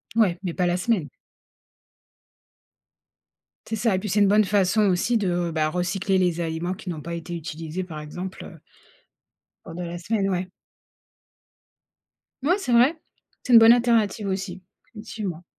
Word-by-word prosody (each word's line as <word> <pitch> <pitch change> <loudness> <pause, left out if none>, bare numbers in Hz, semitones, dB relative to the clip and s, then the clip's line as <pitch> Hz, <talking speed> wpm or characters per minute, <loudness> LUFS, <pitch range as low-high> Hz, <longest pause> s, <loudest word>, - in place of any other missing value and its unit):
Ouais, 200 -7 +3
mais 175 -3 -3
pas 180 - 0
la 175 0 +1
semaine. 180 - 0 2.6
C'est 225 - -2
ça 215 -2 +1
et - - 0
puis 210 0 -5
c'est 205 +3 +1
une 205 - +5
bonne 210 +2 +5
façon 200 +1 +2
aussi 190 +6 +1
de, 175 -4 -1
bah 155 -1 0
recycler 190 +3 -1
les 175 -2 +1
aliments 165 +2 -2
qui 195 -1 -9
n'ont 160 -3 -4
pas 170 +3 -6
été 170 +1 -6
utilisés 165 +2 -5
par 155 -4 -8
exemple, 180 +5 -7
heu 165 - -12 1.1
pendant 170 +2 -7
la 170 0 -5
semaine, 195 +2 -1
ouais. 185 -1 -1 1.9
Mouais, 345 +9 +2
c'est 385 -11 -4
vrai, 270 +7 +4 0.4
c'est 250 - 0
une 230 - +11
bonne 225 +1 +8
alternative 230 -4 +1
aussi. 190 -1 -4 0.3
Effectivement. 210 -6 -6
185 Hz, 155 wpm, -24 LUFS, 175-215 Hz, 2.6 s, une